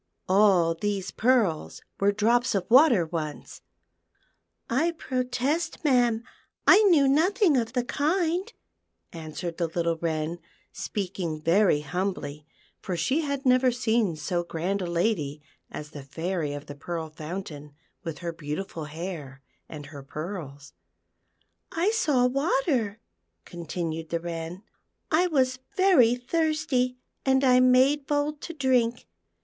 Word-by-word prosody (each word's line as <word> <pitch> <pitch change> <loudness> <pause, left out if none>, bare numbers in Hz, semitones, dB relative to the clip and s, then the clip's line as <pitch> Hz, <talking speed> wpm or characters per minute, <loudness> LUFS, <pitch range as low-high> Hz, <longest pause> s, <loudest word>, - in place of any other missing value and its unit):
All 185 -4 +4
these 195 +1 -3
pearls 220 -10 +1 0.2
were 200 +1 +3
drops 230 +3 +2
of 190 -2 0
water 250 - +6
once." 155 -2 -6 0.5
" - - -43 0.2
I 315 +8 +1
protest, 255 +6 -2
ma'am, 240 -5 +3 0.4
I 415 - +8
knew 290 -6 +5
nothing 335 - +3
of 235 -2 0
the 250 -2 +1
kind," 345 - 0 0.6
answered 165 +1 -6
the 170 - +1
little 170 0 -1
Wren, 160 0 -2 0.3
speaking 180 -5 -4
very 165 -1 +3
humbly, 150 -3 -4 0.3
for 180 -2 -3
she 275 - +1
had 280 -3 -3
never 255 0 +5
seen 225 -6 +1
so 175 +3 -2
grand 175 +4 -2
a 180 - -2
lady 170 -5 -1 0.3
as 150 0 -8
the 145 - -8
Fairy 160 +2 -3
of 145 0 -7
the 145 - -8
Pearl 160 +2 -5
Fountain, 155 -2 -7 0.3
with 165 -3 -5
her 170 - -2
beautiful 160 +1 -5
hair 150 -4 -7 0.3
and 150 -2 -8
her 145 -1 -10
pearls; 145 -1 -7 0.5
" 85 0 -44 0.2
I 355 +6 +1
saw 295 - +2
water," 265 - 0 0.5
continued 165 -2 -5
the 170 - -1
Wren, 170 +2 -6 0.2
*' - - -52
I 340 +3 +4
was 260 -6 +1 0.2
very 320 -12 +5
thirsty, 295 -2 0 0.3
and 265 0 +3
I 250 -1 +5
made 260 +3 +4
bold 290 0 -1
to 335 - -6
drink. 250 -4 +1
200 Hz, 135 wpm, -26 LUFS, 165-260 Hz, 0.6 s, I